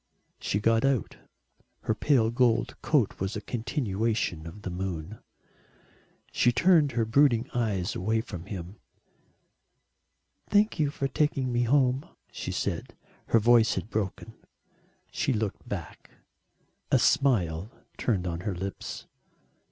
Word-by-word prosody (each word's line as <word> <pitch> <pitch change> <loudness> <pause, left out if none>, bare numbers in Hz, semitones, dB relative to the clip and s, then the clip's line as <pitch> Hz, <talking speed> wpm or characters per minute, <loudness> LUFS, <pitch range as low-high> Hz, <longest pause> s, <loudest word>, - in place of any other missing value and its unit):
She 100 - -1
got 115 +1 +2
out. 135 -6 0 0.6
Her - - 0
pale 115 -1 +2
gold 120 -1 +2
coat 140 -9 +1
was 95 +1 -2
a - - -2
continuation 110 - -2
of 100 +5 -10
the 90 - -4
moon. 90 +2 -5 1.1
She 120 - +3
turned 150 +1 +4
her 115 -1 +1
brooding 120 0 +3
eyes 105 -7 -1
away 110 +4 0
from 90 -6 -8
him. 95 0 -7 1.7
"Thank 210 -1 +3
you 150 -2 +2
for 140 -1 -2
taking 135 -2 0
me 120 0 +1
home," 130 +1 +3 0.3
she - - -5
said; - - -3 0.3
her - - +4
voice 115 0 +5
had 95 +4 -5
broken. 110 +1 -3 0.8
She 135 - 0
looked 110 -3 -3
back - - -7 0.8
a - - +5
smile 95 - +2 0.3
turned 100 -7 0
on 85 -2 -3
to 90 - -10
her 100 -4 -1
lips. 95 +2 -6
115 Hz, 130 wpm, -28 LUFS, 95-125 Hz, 1.7 s, voice